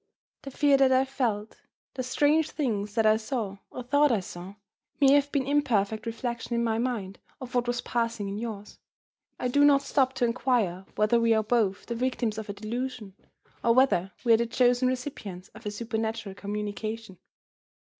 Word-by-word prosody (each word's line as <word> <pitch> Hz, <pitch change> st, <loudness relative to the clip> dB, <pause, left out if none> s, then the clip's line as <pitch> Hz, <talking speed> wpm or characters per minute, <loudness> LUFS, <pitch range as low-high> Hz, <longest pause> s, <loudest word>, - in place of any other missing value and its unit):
The 275 Hz, -, -7 dB
fear 280 Hz, +1 st, +3 dB
that 270 Hz, -1 st, +4 dB
I 260 Hz, +1 st, +4 dB
felt, 230 Hz, -6 st, -3 dB, 0.3 s
the 255 Hz, -, -3 dB
strange 295 Hz, +5 st, +2 dB
things 210 Hz, -8 st, -2 dB
that 225 Hz, -, +2 dB
I 215 Hz, 0 st, +5 dB
saw 220 Hz, -3 st, -4 dB
(or 250 Hz, -, -7 dB
thought 285 Hz, +3 st, +3 dB
I 225 Hz, -, +2 dB
saw), 185 Hz, +1 st, -9 dB, 0.4 s
may 275 Hz, -1 st, +6 dB
have 285 Hz, 0 st, +3 dB
been 275 Hz, -3 st, 0 dB
imperfect 230 Hz, -7 st, +1 dB
reflections 235 Hz, +1 st, -3 dB
in 235 Hz, -, +1 dB
my 225 Hz, -1 st, 0 dB
mind 225 Hz, -6 st, -3 dB, 0.2 s
of 255 Hz, -2 st, -9 dB
what 245 Hz, -1 st, +1 dB
was 245 Hz, 0 st, -1 dB
passing 230 Hz, -3 st, -2 dB
in 200 Hz, +1 st, -4 dB
yours. 215 Hz, -3 st, -7 dB, 0.6 s
I 250 Hz, -, -1 dB
do 285 Hz, +4 st, +3 dB
not 280 Hz, -1 st, +5 dB
stop 265 Hz, -2 st, +1 dB
to 260 Hz, -2 st, +1 dB
inquire 230 Hz, -7 st, 0 dB
whether 215 Hz, +3 st, +3 dB
we 230 Hz, -1 st, +3 dB
are 220 Hz, -, +2 dB
both 215 Hz, -3 st, 0 dB
the 235 Hz, -, -4 dB
victims 235 Hz, -2 st, -1 dB
of 215 Hz, -, -8 dB
a -, -, -2 dB
delusion, 225 Hz, 0 st, -5 dB, 0.5 s
or 230 Hz, 0 st, +4 dB
whether 195 Hz, -8 st, +3 dB
we 230 Hz, -, +6 dB
are -, -, +6 dB
the 235 Hz, +1 st, 0 dB
chosen 245 Hz, +1 st, +3 dB
recipients 240 Hz, -8 st, -5 dB
of -, -, -10 dB
a -, -, 0 dB
supernatural 220 Hz, -1 st, -3 dB
communication. 210 Hz, 0 st, -5 dB
235 Hz, 185 wpm, -27 LUFS, 210-255 Hz, 0.6 s, may